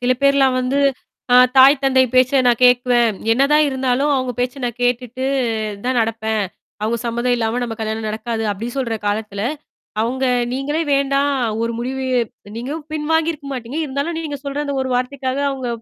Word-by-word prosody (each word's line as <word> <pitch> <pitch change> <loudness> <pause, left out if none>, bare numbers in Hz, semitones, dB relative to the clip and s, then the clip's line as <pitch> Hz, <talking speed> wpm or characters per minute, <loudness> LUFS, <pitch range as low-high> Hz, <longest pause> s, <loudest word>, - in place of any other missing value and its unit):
சில 250 +1 +2
பேர்லாம் 275 -2 +4
வந்து 260 +3 0 0.6
அ - - +8 0.2
தாய், 270 +2 +8
தந்தை 260 -1 +4
பேச்ச 255 +2 +4
நான் 240 -2 +3
கேட்குவன். 245 -3 +4 0.2
என்னதான் 280 +5 +4
இருந்தாலும், 265 +1 0
அவங்க 255 -1 -1
பேச்ச 250 +2 -2
நான் 240 -1 -3
கேட்டுட்டு 250 +1 -1 0.6
தான் 255 0 0
நடப்பேன். 220 -1 0 0.4
அவங்க 225 +2 0
சம்மதம் 240 +1 0
இல்லாம, 230 +1 -1
நம்ம 235 -2 -3
கல்யாணம் 220 0 -3
நடக்காது. 225 +1 -3
அப்டின்னு 230 +6 -5
சொல்ற 235 -4 -1
காலத்துல? 205 -1 -2 0.6
அவங்க 260 +4 -1 0.3
நீங்களே 290 +5 -1
வேண்டாம். 275 +1 +2 0.3
ஒரு 230 - -1
முடிவு 265 +2 -3 0.5
நீங்களும் 290 +6 -5
பின் 300 -1 -3
வாங்கியிருக்க 320 -3 0
மாட்டீங்க. 255 +4 -5
இருந்தாலும், 280 +5 -3
நீங்க 295 -3 -5
சொல்ற 280 0 -4
அந்த 280 -1 -3
ஒரு 260 - -4
வார்த்தைக்காக 260 +1 -2
அவங்க 260 -2 -5
255 Hz, 160 wpm, -19 LUFS, 235-275 Hz, 0.6 s, அ